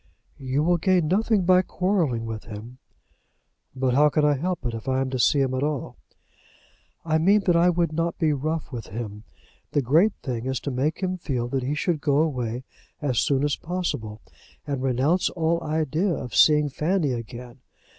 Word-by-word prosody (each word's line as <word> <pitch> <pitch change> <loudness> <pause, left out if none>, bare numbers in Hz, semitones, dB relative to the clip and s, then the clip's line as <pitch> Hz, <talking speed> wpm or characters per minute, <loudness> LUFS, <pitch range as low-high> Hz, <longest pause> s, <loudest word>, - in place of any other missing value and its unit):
"You 135 +2 -1
will 175 +2 +3
gain 180 -1 +2
nothing 205 0 +2
by 185 0 +5
quarrelling 175 - 0
with 110 -1 -6
him." 115 +3 -9 1.0
"But 130 -1 0
how 150 +3 +5
can 150 +1 +1
I 150 - +4
help 175 +2 -3
it, 120 - -2
if 115 +3 -7
I 130 0 +1
am 135 -1 -1
to 130 - -2
see 140 +3 +3
him 130 -1 0
at 130 - -1
all?" 145 -2 -2 1.1
"I 160 -1 +2
mean 200 +6 +4
that 180 -3 +2
I 170 +1 +5
would 170 -2 0
not 165 +1 -1
be 155 -2 +2
rough 155 +3 -3
with 120 -4 -6
him. 105 0 -7 0.5
The 145 - +2
great 165 - +4
thing 125 -2 -3
is 130 -1 -1
to 140 - -3
make 145 +8 -1
him 185 0 -1
feel 125 -7 -2
that 135 +1 -1
he 135 +4 -2
should 155 -1 -1
go 145 -2 +2
away 125 -6 -1 0.4
as 130 -6 0
soon 140 -1 +1
as 145 -1 +1
possible, 125 - -4 0.4
and 140 -3 -3
renounce 135 +7 +1
all 170 0 0
idea 155 +4 0
of 130 -6 -4
seeing 150 -1 +5
Fanny 155 +1 0
again. 120 +1 -7
145 Hz, 190 wpm, -24 LUFS, 125-170 Hz, 1.1 s, by